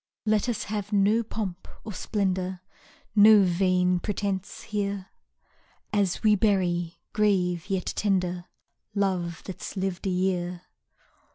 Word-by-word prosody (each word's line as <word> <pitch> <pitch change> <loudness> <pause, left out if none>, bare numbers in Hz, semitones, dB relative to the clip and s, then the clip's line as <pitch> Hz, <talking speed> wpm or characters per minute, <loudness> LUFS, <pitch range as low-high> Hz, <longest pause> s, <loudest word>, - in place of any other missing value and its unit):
Let 215 +2 +2
us 225 -3 -1
have 210 -1 -4
no 205 +3 +3
pomp 205 -5 -5 0.2
or 215 - -6
splendour, 185 -3 -1 0.5
No 210 0 +8
vain 180 0 +2
pretence 195 -1 -3
here. 200 -3 -3 0.8
As 200 -1 +1
we 215 -1 +6
bury, 180 -5 +1 0.2
grave, 185 -4 +1
yet 190 -2 -1
tender, 180 -3 0 0.5
Love 180 -4 -1
that's 190 +1 -7
lived 190 0 -2
a - - +1
year. 180 -1 -1
190 Hz, 115 wpm, -27 LUFS, 180-205 Hz, 0.8 s, No